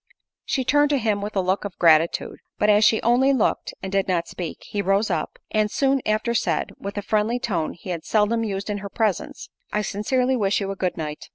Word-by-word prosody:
She 265 - 0
turned 290 +2 +3
to 290 - +2
him 215 -4 0
with 205 +1 -5
a 195 - +2
look 185 +2 0
of 200 -3 -6
gratitude; 165 -1 +3 0.2
but 210 0 +3
as 210 +1 +4
she 220 +1 +5
only 250 +4 +4
looked, 255 - 0
and 190 - -4
did 195 -1 +1
not 175 -3 0
speak, 175 -4 -6
he 205 - -3
rose 200 +2 +1
up, 160 -3 -2
and 215 -1 +1
soon 270 +3 +1
after 215 +2 +1
said, 235 - 0
with 200 +1 -6
a 205 - -2
friendly 215 +3 +1
tone 180 -10 -2
he 180 +2 -8
had 170 -2 -4
seldom 220 +2 +1
used 200 -1 -3
in 205 - -3
her 200 0 -7
presence, 210 -3 -2 0.2
"I 210 - 0
sincerely 250 +6 0
wish 205 -4 +1
you 195 -1 -3
a - - -4
good 185 -2 -2
night." 150 -2 -5
205 Hz, 225 wpm, -23 LUFS, 190-225 Hz, 0.2 s, she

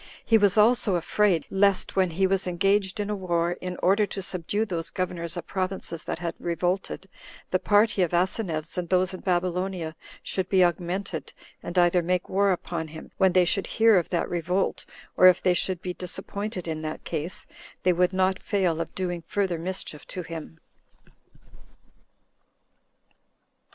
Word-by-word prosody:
He 225 -1 +5
was 205 0 +3
also 215 -3 +4
afraid, 175 0 +2
lest 195 0 +3
when 190 -2 +3
he 185 +4 +1
was 190 0 +1
engaged 195 +3 +1
in 205 0 -2
a - - 0
war, 175 -3 0
in 180 0 -5
order 200 +3 +4
to 195 - -5
subdue 190 +4 -2
those 170 -5 -3
governors 175 -2 -3
of 175 - -5
provinces 185 -3 -3
that - - -3
had 170 0 -3
revolted, 180 +3 -2 0.4
the 185 - +2
party 205 +1 +3
of 175 - +2
Asineus, 175 -2 -1
and 175 - -4
those 185 0 +2
in 185 - -6
Babylonia, 180 -2 -1 0.3
should 185 -1 -2
be 190 -2 +5
augmented, 175 -2 -3 0.3
and 175 - -6
either 175 0 +4
make 180 +1 -1
war 200 +1 +3
upon 170 -2 -3
him, 160 +1 -11
when 190 -2 +4
they 180 0 +5
should 195 +3 0
hear 225 -3 +5
of 170 - -5
that 175 - 0
revolt, 175 +2 -1 0.3
or 185 - +8
if 180 -1 +6
they 180 - +3
should 180 0 -1
be 180 - -3
disappointed 190 +1 -4
in 155 -1 -3
that 155 0 -5
case, 165 +2 -3 0.4
they 180 - +4
would 180 +1 +2
not 190 0 +1
fail 180 -6 0
of 165 - -6
doing 175 -2 -2
further 190 -5 -1
mischief 175 -3 -6
to 180 - -5
him. 160 - -8
180 Hz, 165 wpm, -26 LUFS, 170-195 Hz, 0.4 s, or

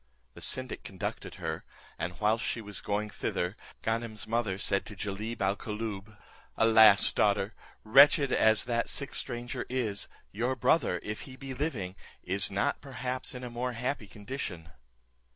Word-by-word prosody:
The - - -12
syndic - - 0
conducted - - -5
her, 80 0 -4 0.4
and 85 0 -4
whilst 110 +2 +2
she - - -1
was 105 -2 -7
going 105 +1 -2
thither, 90 +3 -2 0.3
Ganem's 110 -1 -2
mother 110 -4 0
said 100 0 +2
to 105 - -8
Jalib 105 +3 -4
al 95 +1 +2
Koolloob, 105 -1 -5 0.4
"Alas! 110 -2 +7
daughter, 100 0 +2 0.3
wretched 140 +4 +6
as 110 0 +5
that 120 -1 0
sick 140 - +1
stranger 120 +1 -2
is, 120 -6 -1 0.2
your 120 +6 -1
brother, 120 - +2
if 105 +1 -4
he 130 - -9
be 135 0 -7
living, 125 - -3 0.3
is 95 +1 +1
not 100 +9 0
perhaps 130 -1 -3
in 125 - -6
a 125 - -5
more 125 +1 -2
happy 125 -1 -3
condition." 100 -5 -6
110 Hz, 150 wpm, -30 LUFS, 100-125 Hz, 0.4 s, Alas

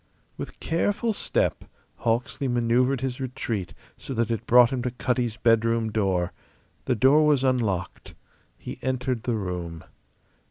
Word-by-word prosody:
With - - -8
careful 205 +7 0
step - - -1 0.3
Hawksley 120 +4 -1
manoeuvred 120 +2 +2
his 130 -1 -3
retreat 115 -7 -4 0.2
so 135 - -6
that 115 0 0
it 115 - -3
brought 125 +1 +7
him 130 -2 -1
to 125 - -1
Cutty's 120 -2 -1
bedroom 115 -1 +2
door. 95 -5 0 0.5
The 125 - +1
door 135 +7 +5
was 145 -3 +3
unlocked. 110 -9 -1 0.4
He - - -8
entered 130 -2 -1
the 120 0 -1
room. 90 -5 -4
120 Hz, 135 wpm, -25 LUFS, 110-130 Hz, 0.5 s, brought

